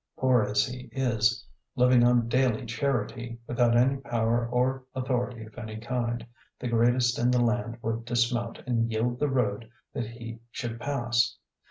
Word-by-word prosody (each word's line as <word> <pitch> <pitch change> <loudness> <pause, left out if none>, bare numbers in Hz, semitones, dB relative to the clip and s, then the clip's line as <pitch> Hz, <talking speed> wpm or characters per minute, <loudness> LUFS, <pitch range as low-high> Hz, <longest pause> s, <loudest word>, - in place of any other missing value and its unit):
Poor 130 -2 +4
as 105 0 +2
he 125 0 -8
is, 115 -4 +1 0.3
living 125 -1 +5
on 120 -1 +4
daily 125 -2 +1
charity, 120 -1 -2
without 120 -1 +2
any 130 +3 +3
power 120 -2 0
or 130 +2 +1
authority 125 -2 -2
of 110 - -13
any 110 -2 -6
kind, 120 0 -2 0.3
the 125 - -4
greatest 120 +1 +2
in 120 - +3
the 125 - +3
land 120 0 0
would 115 +1 -2
dismount 120 0 0
and 115 -2 0
yield 120 +3 -1
the 150 - +1
road 115 -4 0 0.2
that 120 - -3
he 115 0 -8
should 115 -2 -5
pass. 120 -3 0
120 Hz, 160 wpm, -28 LUFS, 115-125 Hz, 0.3 s, living